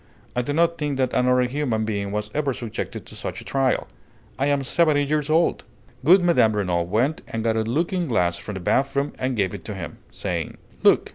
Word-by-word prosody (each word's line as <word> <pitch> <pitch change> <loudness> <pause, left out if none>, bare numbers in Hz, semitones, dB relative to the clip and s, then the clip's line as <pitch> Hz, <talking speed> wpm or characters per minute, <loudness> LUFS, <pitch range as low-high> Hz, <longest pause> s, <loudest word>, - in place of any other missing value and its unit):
I 125 - +2
do 125 - -3
not 170 +2 +2
think 145 -3 -1
that 130 -1 0
another 125 0 +3
human 125 -4 -1
being 100 -2 -2
was 105 0 -3
ever 145 -3 0
subjected 115 -3 -5
to - - -11
such - - -5
a - - -9
trial. 135 -1 +1 0.5
I 140 - +2
am 140 -1 +1
seventy 150 0 +3
years 150 +1 0
old!" 165 +2 +2 0.4
Good 180 +6 +6
Mme. 165 -11 +4
Renault 90 -4 0
went 125 - +1
and 115 -1 -3
got 115 -1 +1
a 110 - +2
looking 165 +10 0
glass 90 -8 +1
from 105 +3 -7
the 95 - -5
bath 135 +9 +1
room 140 +1 0
and 130 -1 -1
gave 100 -2 +1
it 100 - -7
to 105 - -5
him, 85 -5 -7
saying: 85 -5 -4 0.2
"Look!" - - +4
125 Hz, 215 wpm, -23 LUFS, 105-145 Hz, 0.5 s, Good